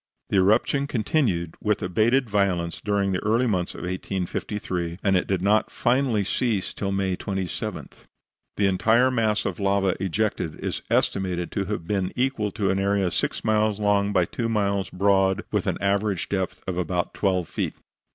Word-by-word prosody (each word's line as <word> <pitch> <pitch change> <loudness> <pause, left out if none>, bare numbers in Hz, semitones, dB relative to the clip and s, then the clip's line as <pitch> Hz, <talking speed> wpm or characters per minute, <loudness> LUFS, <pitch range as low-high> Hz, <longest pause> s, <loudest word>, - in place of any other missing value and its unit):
The - - +3
eruption 110 +8 +3
continued 110 - 0
with 105 -1 0
abated 115 +8 +2
violence 95 -5 0
during 100 -1 +1
the 90 - -2
early 115 +4 +2
months 90 -6 -1
of - - -8
1853, 90 -1 -3
and 95 -1 +3
it 90 - +1
did 95 -2 0
not 105 +2 +3
finally 120 -4 +1
cease 105 0 -1
till 100 -1 -3
May 95 -1 0
27. 95 -2 -4 0.7
The 100 - +2
entire 110 +7 +3
mass 110 -4 +1
of 95 - -3
lava 100 -1 +2
ejected 95 -3 -1
is - - -3
estimated 90 -3 0
to 100 - -1
have 100 -4 -4
been 95 -1 -1
equal 125 -5 0
to 100 -4 0
an 95 - 0
area 100 -2 +1
six - - -1
miles 110 -1 +2
long 105 -1 +2
by 90 -3 +3
two 115 +6 -3
miles 100 -3 0
broad, 95 0 +2
with - - 0
an - - 0
average 100 -1 0
depth 95 -2 -2
of 90 -1 -2
about 90 0 -1
twelve 95 -4 0
feet. - - -3
100 Hz, 170 wpm, -25 LUFS, 95-105 Hz, 0.7 s, The